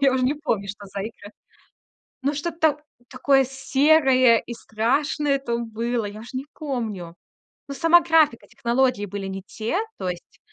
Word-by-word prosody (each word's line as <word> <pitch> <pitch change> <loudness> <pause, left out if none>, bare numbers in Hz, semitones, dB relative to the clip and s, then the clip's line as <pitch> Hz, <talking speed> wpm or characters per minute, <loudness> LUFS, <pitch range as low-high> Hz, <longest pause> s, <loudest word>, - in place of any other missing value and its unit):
Я 275 -1 +4
уже 260 - +1
не 275 +4 +2
помню, 225 -10 -2
что 205 0 -8
за 200 +1 -6
игра. 210 -1 -9 0.9
Но 280 +2 0
что-то 305 -1 0 0.3
такое 270 0 +3
серое 270 -2 +4
и 240 - -6
страшное 275 +6 0
там 235 -3 -3
было. 230 +1 -2
Я 205 +1 -7
уже 230 +4 -10
не 270 - -5
помню. 220 - -5 0.5
Но 280 - -6
сама 330 +5 +6
графика, 320 -7 +3
технологии 240 -3 0
были 200 0 -5
не 195 0 -6
те. 220 - -3 0.2
То 185 - -2
есть 175 -1 -8
255 Hz, 160 wpm, -23 LUFS, 215-285 Hz, 0.9 s, сама